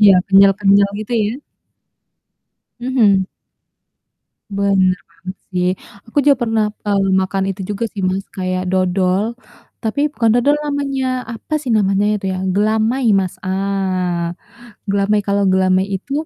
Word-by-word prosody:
Iya, 200 -2 +7
kenyal-kenyal 200 0 +5
gitu 215 +3 -6
ya? 230 +7 -3 1.4
Mhm. 225 -7 +2 1.3
Bener 195 -2 +2
banget 185 0 -9 0.2
sih. 180 0 +1 0.4
Aku 225 - -3
juga 280 - +6
pernah, 225 -2 +1 0.2
eee, 200 -1 +1
makan 190 +1 -1
itu 195 - -13
juga 205 +3 -2
sih, 195 - -5
Mas, 190 +1 -2
kayak 185 -1 -2
dodol, 185 +1 +1 0.6
tapi 225 +4 -2
bukan 230 -6 +1
dodol 285 +5 +3
namanya. 270 -3 -2
Apa 230 +7 -6
sih 255 - -4
namanya 200 -1 +2
itu, 195 - -13
ya? - - -4 0.2
Gelamai, 220 +5 +1
Mas. 190 -2 0
Ah! 185 -3 -1 0.6
Gelamai. 200 +1 +2
Kalau 200 0 +1
gelamai 185 0 +2
itu 240 - -11
200 Hz, 130 wpm, -18 LUFS, 190-225 Hz, 1.4 s, Iya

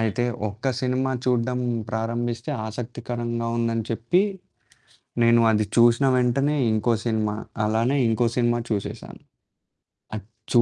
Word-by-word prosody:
అయితే 115 +2 0 0.2
ఒక్క 110 +6 -2
సినిమా 130 +1 0
చూడడం 125 0 +1 0.3
ప్రారంభిస్తే 115 +1 -2 0.2
ఆసక్తికరంగా 120 +1 -4
ఉందని 115 -1 0
చెప్పి. 120 - +2 1.0
నేను 115 0 +5
అది 110 -1 +2
చూశిన 120 +3 +5
వెంటనే 135 +4 +2 0.2
ఇంకో 110 +2 +2
సినిమా, 110 -2 0 0.3
అలానే 115 +6 +1
ఇంకో 115 +1 +2
సినిమా 120 -1 +2
చూసేసాను. 100 -2 -4 1.0
అచ్చు 115 +3 0
120 Hz, 105 wpm, -24 LUFS, 110-125 Hz, 1.0 s, నేను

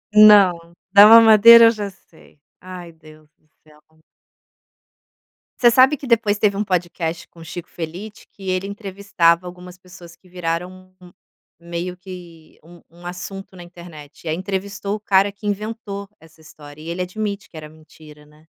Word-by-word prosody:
Não, 190 -6 +5 0.2
da 200 +1 +8
mamadeira 230 +1 +8
eu 230 - +5
já 210 -3 -6
sei. 170 -5 -23 0.2
Ai 180 -2 -11
Deus 155 -1 -19
do 155 - -39 0.2
céu. 150 -1 -23 1.8
Você 240 -1 +5
sabe 260 +4 +4
que 275 - -10
depois 220 -3 +1
teve 205 -2 0
um 210 - -1
podcast 175 -3 -4
com 165 -1 -16
Chico 175 +2 -9
Felitti 180 +6 -9
que 195 -1 -9
ele 185 +1 -2
entrevistava 195 -4 -1
algumas 180 0 -12
pessoas 180 -2 -16
que 180 +2 -26
viraram 180 +2 -6
um 180 -1 -16 0.5
um 170 - -18
meio 175 +1 -5
que 175 -3 -14
um 175 +1 -17
um 175 +1 -18
assunto 190 +2 -9
na 175 - -11
internet, 170 -4 -14
e - - -7
aí 155 - -1
entrevistou 200 +2 -5
o 215 - -8
cara 200 -1 +1
que 205 +2 -15
inventou 205 -1 -6
essa 160 0 -21
história 150 -1 -15
e 165 - -9
ele 175 +2 -5
admite 200 +1 -6
que - - -22
era 155 -1 -10
mentira, 155 -1 -18
né. 150 +1 -24
180 Hz, 170 wpm, -19 LUFS, 165-200 Hz, 1.8 s, da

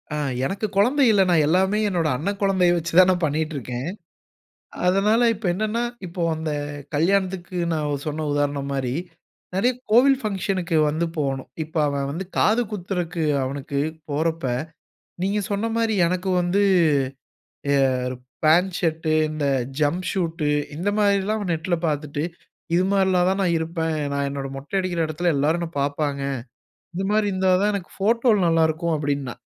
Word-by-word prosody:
அ - - -2 0.3
எனக்கு 200 +7 -2
குழந்தை 255 +8 +4
இல்ல. 200 -2 +4
நான் 160 -4 +4
எல்லாமே 190 +5 +2
என்னோட 170 -4 0
அண்ணன் 195 +8 -3
குழந்தைய 185 -3 +3
வச்சு 170 0 -3
தான், 185 0 +7
நான் 175 -2 -1
பண்ணீட்டுருக்கேன். 145 -4 -2 1.0
அதனால 210 +5 +3
இப்ப 210 -1 -8
என்னன்னா? 215 +5 -1 0.2
இப்போ, 175 +1 -6
அந்த 160 0 -3 0.4
கல்யாணத்துக்கு, 185 +1 0
நான் 145 -3 -2
சொன்ன 155 +1 -2
உதாரணம் 145 -1 -1
மாரி, 130 -2 -1 0.6
நெறைய 245 +7 +2 0.2
கோவில் 260 +4 +5
ஃபங்ஷனுக்கு 190 -4 -1
வந்து 160 +3 0
போனோம். 135 -3 -2
இப்ப 155 +1 -16
அவன் 140 -1 -2
வந்து 180 +6 -4
காது 225 +3 +3
குத்துறக்கு 180 -4 -3 0.2
அவனுக்கு, 140 +1 -3 0.3
போறப்ப, 160 +3 -1 0.8
நீங்க 200 +2 +1
சொன்ன 205 +3 0
மாரி, 225 -1 +1
எனக்கு 185 +2 -2
வந்து, 180 +4 +2 1.1
எர் 130 -2 +1 0.3
பேண்ட் 175 +4 +4
ஷர்ட்டு, 160 -1 0 0.2
இந்த 155 -2 -2 0.3
ஜம்ப் 170 +5 0
ஷூட்டு, 165 -5 -1 0.3
இந்த 180 +5 0
மாதிரிலாம், 200 +1 +2
அவன் 195 -4 -2
நெட்ல 170 +2 -1
பாத்துட்டு, 150 0 -2 0.5
"இது 180 - +3
மாரிலாம் 190 -2 +3
தான், 195 - -1
நான் 175 -2 +2
இருப்பேன். 160 -1 -2 0.2
நான் 140 0 0
என்னோட 140 -1 -4
மொட்டை 145 +8 -4
அடிக்கிற 180 -2 -1
எடத்துல, 160 +2 0
எல்லோரும் 160 +5 +1
என்னை 170 -1 -4
பாப்பாங்க. 140 0 -1 0.7
இந்த 190 - -2
மாரி 215 -1 +2
இருந்தா 190 0 +2
தான், 210 0 +2
எனக்கு 190 -3 -6
ஃபோட்டோல 230 +1 +3
நல்லாருக்கும்" 165 0 +2
அப்படீன்னான். 140 -3 -3
170 Hz, 145 wpm, -23 LUFS, 150-195 Hz, 1.1 s, தான்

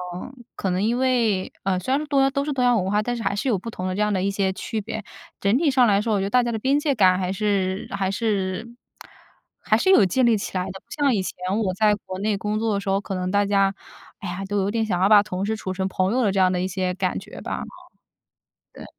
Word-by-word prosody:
嗯， 245 +7 -9
可 190 - -2
能 185 +2 0
因 230 +3 +1
为， 235 -7 +1
呃， 185 -1 0
虽 185 - -7
然 - - +3
说 305 - -4
东 280 -2 +2
亚 270 - +4
都 280 0 -1
是 295 - -3
东 265 -3 0
亚 245 -1 +4
文 190 -4 0
化， 210 +1 +2
但 245 +3 -2
是 230 - -5
还 - - 0
是 205 - -2
有 230 -6 +2
不 210 +5 -7
同 185 -3 -4
的 185 - -2
这 205 - -1
样 210 0 +2
的 190 -2 0
一 195 - +1
些 195 -1 0
区 215 +3 -4
别。 220 +1 -5 0.4
整 200 +4 +2
体 300 0 +2
上 255 -2 +4
来 200 -1 +3
说， 220 0 -1
我 205 - +2
觉 - - -1
得 - - -2
大 250 +3 +3
家 240 - -1
的 225 - -3
边 270 +6 +2
界 295 -1 +1
感 185 -6 +4
还 185 -1 -2
是 195 -1 -1
还 195 -1 -1
是 200 0 -1 0.9
还 - - +2
是 375 - +1
有 225 - +6
建 250 +8 +2
立 230 -2 +4
起 195 - -4
来 180 - -1
的， 190 - -5
不 - - -64
像 285 -4 +1
以 195 - 0
前 - - -5 0.2
我 195 -4 0
在 210 +1 +3
国 185 -1 -6
内 205 0 0
工 210 +2 -2
作 225 -1 0
的 200 - 0
时 195 - -4
候， 195 0 +2
可 195 -1 -5
能 185 0 -2
大 205 +1 +2
家， 195 -1 +2 0.5
哎 200 - -6
呀， 175 +2 -4
都 205 +1 -2
有 195 0 +1
点 225 +1 0
想 180 -4 -1
要 190 - +5
把 205 -1 +7
同 190 -1 -3
事 220 +1 -1
处 190 -3 -5
成 190 0 -2
朋 190 +1 0
友 255 - +1
的 205 - +2
这 195 - 0
样 185 -1 +4
的 180 - -1
一 185 - -1
些 185 -1 -2
感 185 -1 -1
觉 - - -11
吧。 - - -4 1.1
对。 - - -11
205 Hz, 315 characters per minute, -23 LUFS, 190-230 Hz, 1.1 s, 把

